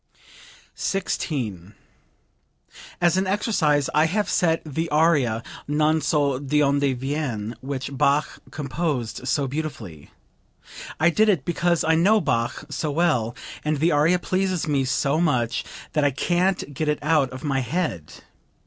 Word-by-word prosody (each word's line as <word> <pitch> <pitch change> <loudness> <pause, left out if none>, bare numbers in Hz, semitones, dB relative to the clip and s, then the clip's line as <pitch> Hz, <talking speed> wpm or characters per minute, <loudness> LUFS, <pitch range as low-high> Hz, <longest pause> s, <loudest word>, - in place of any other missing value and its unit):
16. 115 - -3 1.2
"As 175 0 +3
an 190 0 +1
exercise 180 - +1
I 155 +1 +4
have 205 +5 -1
set 165 -4 +2
the 160 +2 -3
aria, 145 -8 +2 0.2
'Non 155 +2 +2
so 140 -4 +1
d'onde 140 0 +1 0.2
viene,' 130 -6 -3
which 135 0 -5
Bach 140 +3 +1
composed 140 -5 -3
so 140 0 +1
beautifully. 130 - -6 0.9
I 160 +3 +4
did 215 +5 +3
it 175 -10 +1
because 170 0 +1
I 160 - +3
know 195 +7 +4
Bach 120 - -1
so 155 - -2
well, 145 -7 +1 0.3
and 150 0 0
the 165 +4 +2
aria 155 +5 +3
pleases 185 -1 -1
me 140 -3 +1
so 140 +4 +1
much 125 -8 +1 0.3
that 150 -1 +2
I 145 - +4
can't 175 +2 0
get 155 +3 -2
it 150 - +1
out 150 -4 +2
of 130 +1 -9
my 140 -3 0
head. 125 - -2
150 Hz, 140 wpm, -23 LUFS, 130-165 Hz, 1.2 s, I